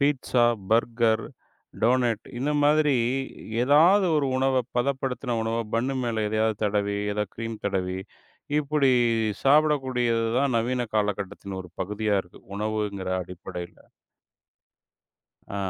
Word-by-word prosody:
Pizza, 135 -4 +2 0.3
burger, 115 0 +2 0.6
donut 120 -2 +2
இந்த 145 +4 0
மாதிரி 150 -2 +4 0.7
ஏதாவது 170 +8 +5
ஒரு 140 -2 +1
உணவ, 130 -1 +2 0.2
பதப்படுத்தன 130 -2 -1
உணவ 115 +1 -1 0.2
பன்னு 130 +4 0
மேல 110 -2 -1
எதையாவது 110 0 +1
தடவி, 100 0 0 0.2
ஏதா 105 0 -1
க்ரீம் 115 0 -5
தடவி. 95 -2 -2 0.6
இப்படி 145 -2 +2 0.5
சாப்பிடக்கூடியதுதான் 130 -4 +2
நவீன 125 +2 -1
காலகட்டத்தின் 100 -2 -2
ஒரு 90 -2 -11
பகுதியா 105 +2 0
இருக்கு, 90 - -18 0.2
உணவுங்கிற 105 -3 -2
அடிப்படையில. 90 0 -8 1.8
அ, - - -2
115 Hz, 105 wpm, -25 LUFS, 105-135 Hz, 1.8 s, ஏதாவது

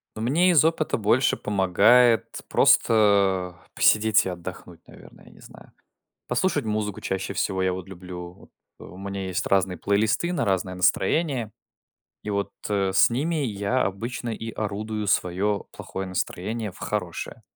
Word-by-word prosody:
Ну, 110 - -6
мне 155 +11 +3
из 155 -3 +5
опыта 160 -1 0
больше 115 +4 +2
помогает 105 +5 +4 0.2
просто, 100 -5 +3 0.2
э, - - -55
посидеть 110 0 +4
и - - -2
отдохнуть, 85 -2 -8
наверное, - - -16
я - - -16
не - - -19
знаю. - - -15 0.6
Послушать 145 +2 0
музыку 105 -2 -2
чаще 95 0 -3
всего 95 -2 -1
я 95 -1 +1
вот 90 0 -7
люблю. 90 -1 -9
Вот - - -19 0.4
у - - -12
меня 100 0 -5
есть 95 -1 -2
разные 95 -2 +1
плейлисты 105 - +1
на 180 - -1
разное 95 -1 -1
настроение. 120 - +1 0.7
И 105 - -5
вот, 100 -1 -2 0.2
э, 100 -2 0
с 95 - +5
ними 150 +8 -1
я 105 +2 -1
обычно 115 +5 -4
и 115 0 -5
орудую 105 0 -4
своё 95 +3 0
плохое 95 0 -6
настроение 105 +4 -3
в - - -16
хорошее. - - -4
105 Hz, 155 wpm, -24 LUFS, 95-115 Hz, 0.7 s, из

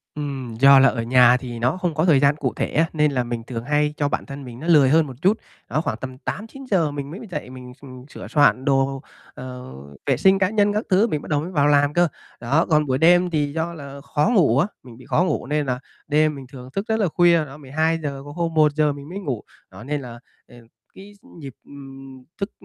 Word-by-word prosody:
Ừm, 135 -6 -5
do 135 0 +8
là 135 - +6
ở 115 -2 -3
nhà 125 0 +5
thì 120 -3 -7
nó 125 +9 0
không 175 -3 -2
có 160 +3 0
thời 150 -6 +5
gian 140 +1 +3
cụ 140 -4 -3
thể - - -1
á, 160 - +2
nên 150 -1 +2
là 125 -2 0
mình 120 -1 -5
thường 115 -2 -5
hay 150 +2 0
cho 145 -1 0
bản - - -3
thân 140 0 -8
mình 120 0 -10
nó 160 - -7
lười 150 -6 +5
hơn 160 0 +3
một 130 - -8
chút. 205 +4 +3 0.3
Đó, 155 - 0
khoảng 110 - -3
tầm 130 +1 -8
8:00-9:00 205 - -3
mình 145 0 -6
mới 185 - -8
dậy, 150 -6 -5
mình 125 -1 -11
s - - -26 0.3
sửa - - -9
soạn 140 -3 +3
đồ, 135 -1 +1 0.3
ờ, 125 - -9 0.3
vệ - - +1
sinh 190 0 +4
cá 185 - +2
nhân 205 -1 +2
các 215 - -1
thứ 195 +5 +4
mình 150 -7 -2
bắt - - -11
đầu 145 -1 +1
mới 175 - -6
vào 145 -5 +2
làm 145 0 +3
cơ. 175 0 +3 0.3
Đó, 140 +8 +1
còn 150 -2 +3
buổi 130 -2 0
đêm 175 +4 +4
thì 150 -3 -1
do 165 +1 -2
là 140 -3 -9
khó 145 +6 0
ngủ 140 - +4
á, 175 - +2 0.2
mình 120 -3 -13
bị 130 - -15
khó 180 - +1
ngủ 180 - -2
nên 150 +1 0
là 125 -2 -2 0.3
đêm 150 +1 +2
mình 135 -2 -9
thường 125 -1 -11
thức 195 +2 -2
rất 220 0 0
là 205 - +2
khuya, 170 -1 +3
đó, 140 +1 -11
12:00, 150 0 -2
có 145 - -9
hôm 165 +1 -3
1:00 150 -1 +3
mình 140 +1 -11
mới 190 +3 -6
ngủ. 135 - -4 0.3
Đó, - - -11
nên 145 +2 -3
là, 120 -2 -10 0.3
à, 120 - -17 0.4
cái 200 +2 -13
s - - -26
nhịp, 140 -4 -9
ừm, 135 -2 -12 0.2
thức, 200 +1 -2
145 Hz, 250 wpm, -22 LUFS, 130-165 Hz, 0.4 s, do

